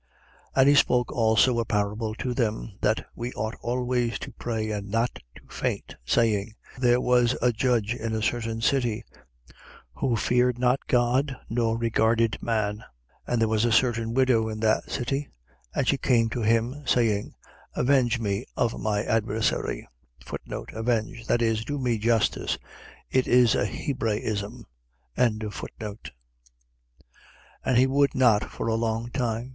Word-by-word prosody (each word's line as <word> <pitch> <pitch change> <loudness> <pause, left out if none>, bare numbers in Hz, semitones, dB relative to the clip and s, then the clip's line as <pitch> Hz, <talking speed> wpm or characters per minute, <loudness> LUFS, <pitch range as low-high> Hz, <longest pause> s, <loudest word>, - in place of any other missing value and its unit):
18:1. - - +1
And 135 - +6
he - - +6
spoke 125 -3 +3
also 115 +2 +3
a - - +1
parable 105 +1 -1
to 125 +1 -3
them, 115 -2 -1
that 110 +1 +1
we 120 +1 -4
ought 110 +2 -3
always 125 0 -1
to - - -8
pray 110 -2 -3
and 100 -1 -4
not 115 +3 0 0.2
to - - -13
faint, - - -3 0.2
18:2. - - -4
Saying: 110 -1 +2 0.2
There 120 -1 +4
was 125 -1 +3
a 125 +1 +3
judge 115 -2 +1
in 115 -2 -3
a 110 - -2
certain 115 0 -1
city, 120 -3 +1 0.9
who 130 -4 +1
feared 125 +2 +2
not 125 +2 +1
God 125 +3 +2 0.2
nor 115 -1 +1
regarded 115 0 +1
man. 105 -3 0
18:3. 110 - -14 0.4
And 120 -2 0
there 115 - +4
was 110 0 +1
a 120 - +2
certain 115 -1 +2
widow 125 -4 +3
in 110 0 -5
that 110 -1 +1
city; 135 +3 -2 0.5
and 130 - 0
she 140 - +2
came 115 -3 +2
to 120 - -2
him, 115 +5 +1
saying: 110 -4 +1 0.4
Avenge 125 -3 +2
me 100 -3 -2
of 60 - 0
my 105 -1 0
adversary. 110 -1 -1 0.9
Avenge.. 115 0 -2
.That 120 - +2
is, 110 -1 +1
do 145 +4 -3
me 125 -4 0
justice. 115 0 +1 0.5
It 130 -1 +2
is 125 -2 +5
a 100 - +1
Hebraism. 110 -4 -3 0.5
18:4. 110 -2 -3 1.5
And 130 -2 +2
he 130 - +6
would 140 +1 +2
not 120 -5 +4
for - - -5
a 115 - +1
long 115 +1 -1
time. 120 -1 -2
115 Hz, 155 wpm, -26 LUFS, 110-125 Hz, 1.5 s, And